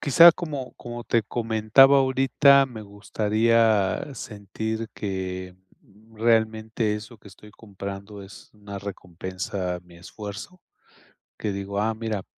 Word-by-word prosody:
quizá, 165 +5 +8
como 145 -7 -6
como 120 0 -8
te 115 -3 +1
comentaba, 115 +5 +4
ahorita 135 +1 +4
me 120 -4 -9
gustaría 110 +3 +1
sentir 110 +1 -5
que, 95 -2 -5 0.2
mm, 110 +3 -23
realmente 110 -1 +1
eso 110 +2 -9
que - - -19
estoy 100 +2 -15
comprando 100 -1 -9
es 100 +3 -14
una 100 -1 -8
recompensa 95 -1 -5
a 90 - -11
mi 90 -1 -18
esfuerzo, 105 - -9 0.8
que 105 - -2
digo: 100 +1 -4
"Ah, 110 +1 0
mira". 110 -3 -4
110 Hz, 125 wpm, -25 LUFS, 100-115 Hz, 0.8 s, quizá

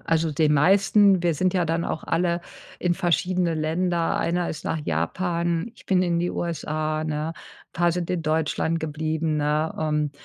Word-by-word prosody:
also, 165 -1 +1
den 150 0 +2
meisten 195 +4 +4
wir 170 -2 +2
sind 185 +4 +1
ja 180 -2 +2
dann 165 +1 0
auch 160 - -3
alle 170 +1 0 0.4
in 175 -1 +1
verschiedene 175 0 +1
Länder. 165 +2 0
Einer 175 +1 0
ist 155 - -6
nach 160 - -1
Japan, 170 - -1
ich - - -18
bin 185 -2 +3
in 170 -2 +1
die 175 +1 0
USA, 155 -2 -2
ne? 155 +1 -2 0.4
Paar 175 0 +2
sind 175 -1 -3
in 180 -3 -1
Deutschland 160 +1 0
geblieben, 155 0 -2
ne? 150 +2 0
Ähm, 150 -2 0
165 Hz, 170 wpm, -24 LUFS, 155-175 Hz, 0.4 s, meisten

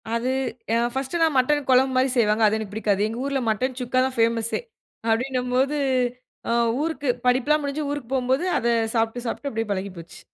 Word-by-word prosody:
அது, 230 +2 -1 0.5
அ - - +4 0.2
ஃபர்ஸ்ட்லாம் 300 +4 0
மட்டன் 290 +3 +2
குழம்பு 260 +1 +4
மாரி 260 +1 +3
செய்வாங்க, 220 -1 +3
அது 210 +1 +3
எனக்குப் 215 -2 -6
பிடிக்காது. 205 -2 0
எங்க 225 +1 -5
ஊர்ல 275 -1 0
மட்டன் 250 +4 -1
சுக்கா 250 +1 0
தான் 260 -1 -3
ஃபேமஸ்சே. 230 - +1 0.5
அப்டின்னும் 250 +2 0
போது, 270 +3 +2 0.7
அ - - +1 0.3
ஊருக்கு 300 -4 -2 0.2
படிப்பெல்லாம் 265 +5 +3
முடிஞ்சு 285 +1 -2
ஊருக்குப் 270 -3 -5
போம் 255 -1 -1
போது, 295 +7 0
அத 235 - -1 0.3
சாப்ட்டு, 225 +2 0
சாப்ட்டு 280 +4 -3
அப்டியே 225 0 -2
பழகிப் 190 -1 -5
போச்சு. 165 0 -12
250 Hz, 180 wpm, -24 LUFS, 225-270 Hz, 0.7 s, அ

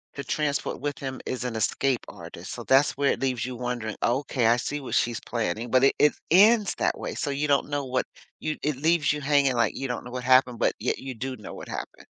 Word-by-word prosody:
to 140 - -5
transport 145 +2 -1
with 145 -1 -3
him 130 -1 -5
is 130 -1 -3
an 125 -2 -3
escape 130 +3 +1
artist? - - -9
So - - -7
that's 135 +2 +4
where 140 0 +3
it - - -2
leaves 130 -3 -1
you 130 0 -5
wondering, 120 -3 -3
"Okay. 125 -1 +1
I 115 - +5
see 145 +4 -3
what 130 - -4
she's 120 -1 +1
planning." 115 0 -3
But 130 0 +4
it - - +3
it 150 - +5 0.2
ends 210 +3 +5
that - - 0
way, - - -5
so - - -2
you 140 +2 -1
don't 140 -1 +2
know 145 -1 -1
what 130 0 -1 0.3
you 155 0 -3
it 150 -2 0
leaves 160 +1 +2
you 150 - -3
hanging 140 -2 +3
like 120 -1 +1
you 135 - -3
don't 125 - -3
know 125 - -8
what 125 0 -5
happened, 130 -1 +4
but - - +2
yet 115 - -1
you 130 -1 -6
do 130 +3 -4
know 105 - -9
what - - -9
happened. - - -7
130 Hz, 245 wpm, -26 LUFS, 125-145 Hz, 0.3 s, I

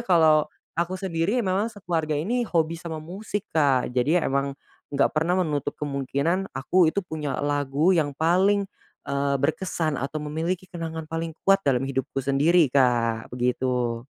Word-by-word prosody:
kalau, 155 -4 +5 0.2
aku 175 +3 -1
sendiri 185 +2 -1
memang 195 +4 +1
sekeluarga 170 -8 -2
ini 235 +10 -1
hobi 165 -1 0
sama 165 -2 -5
musik 190 +6 -5
Kak 140 -6 +2
jadi 145 +8 +2
emang, 140 0 -1 0.3
nggak 140 -1 +1
pernah 165 +4 +1
menutup 145 -3 -2
kemungkinan 145 +6 -1
aku 170 +5 +3
itu 200 +4 -1
punya 155 -5 -4
lagu 145 +4 +2
yang 150 -5 0
paling, 190 +6 +3 0.4
eee, 140 0 0
berkesan 155 +2 -1
atau 140 +3 -3
memiliki 165 +5 -2
kenangan 165 -2 -5
paling 165 0 -4
kuat 195 0 +5
dalam 135 -7 +1
hidupku 135 -1 -3
sendiri 150 +6 +4
Kak 120 -4 +2
begitu. 125 -1 -1
155 Hz, 145 wpm, -25 LUFS, 140-175 Hz, 0.4 s, kalau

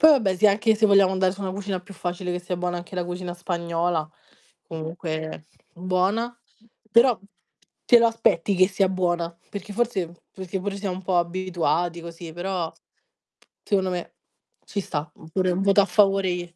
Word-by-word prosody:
Poi 315 - +9
vabbè 220 -11 +4
sì 215 - +5
anche 215 +2 +3
se 215 0 +4
vogliamo 195 -2 +5
andare 185 0 +2
su 200 - -10
una 190 -2 -2
cucina 195 -1 -3
più 195 +2 -13
facile 180 0 -3
che 180 - -2
sia 180 0 -4
buona 175 0 -2
anche 175 +2 -9
la 180 - 0
cucina 175 0 -5
spagnola, 170 -2 -1 0.6
comunque 160 -1 -5 0.3
buona, 185 +7 0 0.5
però 235 +1 +5 0.7
te 240 - +7
lo 235 - +5
aspetti 205 -4 +1
che 185 0 +6
sia 195 0 +2
buona. 175 -2 -1
Perché 205 +1 -6
forse 200 -6 -1 0.2
perché 190 0 -5
pure 200 +1 -3
siamo 195 -2 -3
un 190 - -8
po' 185 -1 +1
abituati 175 -1 0
così, 170 0 -9
però 175 -1 -3 0.9
secondo 190 -2 +1
me 180 -1 -4 0.5
ci 205 - -3
sta. 150 -4 -4
Oppure 185 +3 -1
un 180 +2 0
voto 200 +1 +5
a - - +2
favore 195 -2 +3
glie 175 -1 -6
185 Hz, 175 wpm, -24 LUFS, 175-200 Hz, 0.9 s, Poi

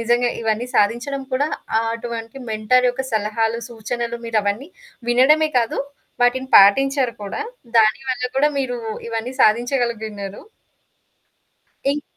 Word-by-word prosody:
నిజంగా 240 +1 +2
ఇవన్నీ 225 +2 -1
సాధించడం 240 +7 +1
కూడా 280 +4 +1 0.3
ఆహ్, 225 - -1
అటువంటి 230 0 -6
మెంటర్ 220 +4 +3
యొక్క 265 +2 -4
సలహాలు, 220 +2 0
సూచనలు 235 +1 -4
మీరవన్నీ 220 +5 -1 0.4
వినడమే 300 +6 +4
కాదు. 230 -2 -1 0.4
వాటిని 260 +2 +2
పాటించారు 260 +5 +5
కూడా. 200 - -5 0.4
దానివల్ల 250 +4 +2
కూడా 290 +2 +4
మీరు 250 -3 -1 0.3
ఇవన్నీ 230 +2 -3
సాధించగలిగియున్నారు. 220 -4 0 1.5
ఇంక్ 295 - -4
235 Hz, 110 wpm, -21 LUFS, 220-260 Hz, 1.5 s, పాటించారు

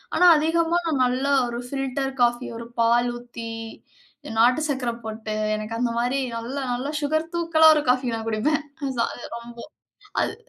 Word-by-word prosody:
ஆனா 360 - +5
அதிகமா, 330 +2 +2 0.2
நல்ல 255 +2 0 0.2
ஒரு 240 0 -4
'ஃபில்டர் 270 0 -2
காஃபி', 240 +1 +2
ஒரு 230 - -7 0.2
பால் 235 +1 +4
ஊத்தி, 240 -1 -8 0.9
நாட்டு 250 +6 +5
சர்க்கரை 255 -4 -1
போட்டு, 220 0 -4 0.2
எனக்கு 215 +1 -5
அந்தமாரி 245 +2 0 0.2
நல்லா 255 +5 -4
நல்ல 255 +3 -3
சுகர் 315 +3 0
தூக்கலா 330 -2 +4
ஒரு 300 - +1
காஃபி, 250 -2 -1
நான் 225 0 -5
குடிப்பேன். 290 +8 +1 0.4
ச - - -2
அது 245 - -9
ரொம்ப, 235 0 -11 0.6
அது - - 0
250 Hz, 150 wpm, -24 LUFS, 235-290 Hz, 0.9 s, ஆனா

